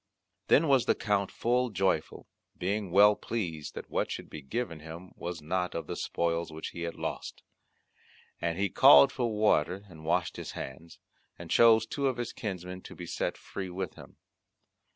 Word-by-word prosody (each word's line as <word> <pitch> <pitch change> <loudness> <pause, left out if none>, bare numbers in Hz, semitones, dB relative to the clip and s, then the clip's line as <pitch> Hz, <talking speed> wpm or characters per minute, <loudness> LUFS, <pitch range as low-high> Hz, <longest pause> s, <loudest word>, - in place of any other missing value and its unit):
Then 160 +3 +5
was 135 -3 +3
the - - +4
Count 100 -3 0
full 125 +2 +1
joyful, 95 -6 -1 0.3
being 100 +1 -2
well 105 +3 +6
pleased 85 -12 -4
that - - -8
what - - 0
should - - -6
be 75 - -7
given 85 - -4
him 80 +4 -10
was 85 -3 -6
not 90 +3 -1
of 85 - -3
the - - -5
spoils 85 -1 -1
which 80 0 -6
he 85 - -8
had 85 0 -3
lost; - - -5 1.0
and 85 0 -1
he 100 +1 +1
called 135 +4 +7
for 120 -4 -1
water 100 -3 +1
and 80 -3 -13
washed 85 +2 0
his - - -6
hands, 75 +6 -8 0.4
and 85 -1 -9
chose 115 -1 +6
two 140 +4 -1
of 130 -2 -1
his 120 - -4
kinsmen 90 -3 -5
to - - -11
be 90 - -7
set - - -2
free 95 -2 -6
with 90 -1 -4
him. - - -14
95 Hz, 180 wpm, -30 LUFS, 85-110 Hz, 1.0 s, called